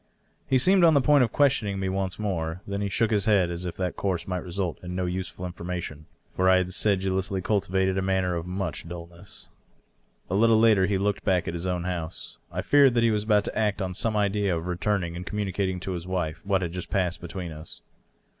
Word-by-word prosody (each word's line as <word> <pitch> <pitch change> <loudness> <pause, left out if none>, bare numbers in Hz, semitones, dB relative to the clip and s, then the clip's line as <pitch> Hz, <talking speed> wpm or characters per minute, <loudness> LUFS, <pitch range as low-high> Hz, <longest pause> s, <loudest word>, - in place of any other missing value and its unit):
He 130 - +3
seemed 185 +8 +4
on 165 -2 +6
the - - +6
point 145 0 +5
of 115 - 0
questioning 110 -9 +2
me 95 - -1
once 95 0 -2
more. 90 -4 -3
Then 100 0 -3
he 100 - -1
shook 115 +3 +1
his 105 -3 +1
head, 100 -5 +3
as 85 +1 -4
if 90 - -5
that 90 -2 -2
course 95 -4 -2
might 90 -1 -2
result 90 -1 -3
in 90 0 -6
no 90 0 -1
useful 90 0 -4
information; 85 -4 -6 0.2
for 95 0 +1
I 95 - +6
had 90 0 -1
sedulously 95 -1 +1
cultivated 95 -1 0
a - - -1
manner 95 -1 0
of 85 0 -4
much 95 -2 -4
dulness. 85 +2 -9 0.8
A - - -5
little 110 +2 +5
later 110 -5 +5
he 100 -1 +1
looked 100 +1 -1
back 95 -3 +1
at - - -2
his 85 +2 -3
own 90 -1 -1
house. 90 -2 -5
I - - -3
feared 140 -4 +5
that 120 - +3
he 115 - +4
was 105 -1 0
about 105 -2 +3
to - - -5
act 105 -2 0
on 95 -2 -2
some 110 +3 0
idea 100 -3 +1
of 80 - -5
returning 90 -1 -1
and 90 - -5
communicating 95 -2 -2
to 95 - -4
his 90 -1 -5
wife 90 -3 -3
what 95 -2 +2
had 85 - -3
just 90 0 -6
passed 90 -2 -1
between 90 0 -6
us. 80 0 -9
95 Hz, 225 wpm, -26 LUFS, 90-105 Hz, 0.8 s, on